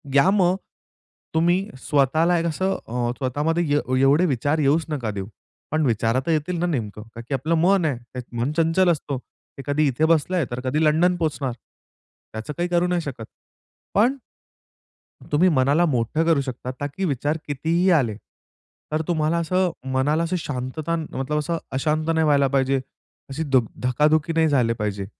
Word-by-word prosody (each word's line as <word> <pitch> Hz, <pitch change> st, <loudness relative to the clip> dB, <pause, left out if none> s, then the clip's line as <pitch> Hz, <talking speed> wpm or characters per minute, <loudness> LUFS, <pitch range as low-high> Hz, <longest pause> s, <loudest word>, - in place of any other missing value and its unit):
या 145 Hz, +7 st, +6 dB
मग 185 Hz, -3 st, +3 dB, 0.8 s
तुम्ही 175 Hz, +4 st, +2 dB, 0.2 s
स्वतःला 155 Hz, +5 st, +2 dB
एक 165 Hz, -, -2 dB
असं 185 Hz, +4 st, 0 dB
अ, 120 Hz, +1 st, -1 dB
स्वतःमध्ये 150 Hz, +6 st, 0 dB
ए 130 Hz, -2 st, 0 dB
एवढे 145 Hz, +6 st, +4 dB
विचार 145 Hz, +3 st, 0 dB
येऊच 150 Hz, +3 st, +2 dB
नका 125 Hz, -8 st, -2 dB
देऊ. 100 Hz, -1 st, -5 dB, 0.4 s
पण 155 Hz, -1 st, +1 dB
विचार 115 Hz, 0 st, +1 dB
तर 165 Hz, -, 0 dB
येतील 160 Hz, +3 st, 0 dB
ना 175 Hz, -, +1 dB
नेमकं 110 Hz, -, -3 dB
कारण 115 Hz, +1 st, -11 dB
की 145 Hz, -, -2 dB
आपलं 155 Hz, +6 st, 0 dB
मन 180 Hz, +2 st, +3 dB
आहे, 145 Hz, -6 st, 0 dB
त्यात 120 Hz, +1 st, -9 dB, 0.2 s
मन 125 Hz, +5 st, 0 dB
चंचल 165 Hz, +3 st, +3 dB
असतो. 145 Hz, -3 st, -3 dB, 0.4 s
ते 135 Hz, -, -6 dB
कधी 145 Hz, +1 st, +2 dB
इथे 140 Hz, +4 st, +1 dB
बसलंय 165 Hz, +1 st, +2 dB
तर 120 Hz, -, -3 dB
कधी 150 Hz, +5 st, +1 dB
लंडन 170 Hz, +4 st, +3 dB
पोहोचणार. 150 Hz, -5 st, -1 dB, 0.8 s
त्याचं 110 Hz, +7 st, -5 dB
काही 175 Hz, +1 st, -1 dB
करू 175 Hz, 0 st, +2 dB
नाही 180 Hz, -1 st, 0 dB
शकत. 135 Hz, -7 st, -6 dB, 0.7 s
पण 240 Hz, +7 st, +4 dB, 1.2 s
तुम्ही 175 Hz, +5 st, +4 dB
मनाला 145 Hz, +3 st, +3 dB
मोठं 145 Hz, +2 st, 0 dB
करू 165 Hz, -4 st, +3 dB
शकता 130 Hz, -1 st, -5 dB
ताकी 145 Hz, +7 st, -3 dB
विचार 145 Hz, +1 st, -1 dB
कितीही 160 Hz, +6 st, +1 dB
आले 125 Hz, -, +2 dB, 0.8 s
तर 155 Hz, +1 st, 0 dB
तुम्हाला 160 Hz, -1 st, +1 dB
असं 180 Hz, +2 st, +1 dB, 0.2 s
मनाला 150 Hz, +5 st, +1 dB
शांतता 150 Hz, +3 st, -3 dB
मतलब 150 Hz, -2 st, -3 dB
असं 165 Hz, +3 st, -2 dB
अशांत 155 Hz, +4 st, 0 dB
नाही 160 Hz, 0 st, +2 dB
व्हायला 140 Hz, -2 st, +4 dB
पाहिजे. 135 Hz, 0 st, +1 dB, 0.5 s
अशी 145 Hz, +4 st, -3 dB
धुक 130 Hz, -5 st, +2 dB, 0.2 s
धकाधुकी 150 Hz, +5 st, +2 dB
नाही 160 Hz, 0 st, +3 dB
झाले 125 Hz, -5 st, +2 dB
पाहिजे. 105 Hz, -3 st, -3 dB
150 Hz, 165 wpm, -23 LUFS, 130-165 Hz, 1.2 s, या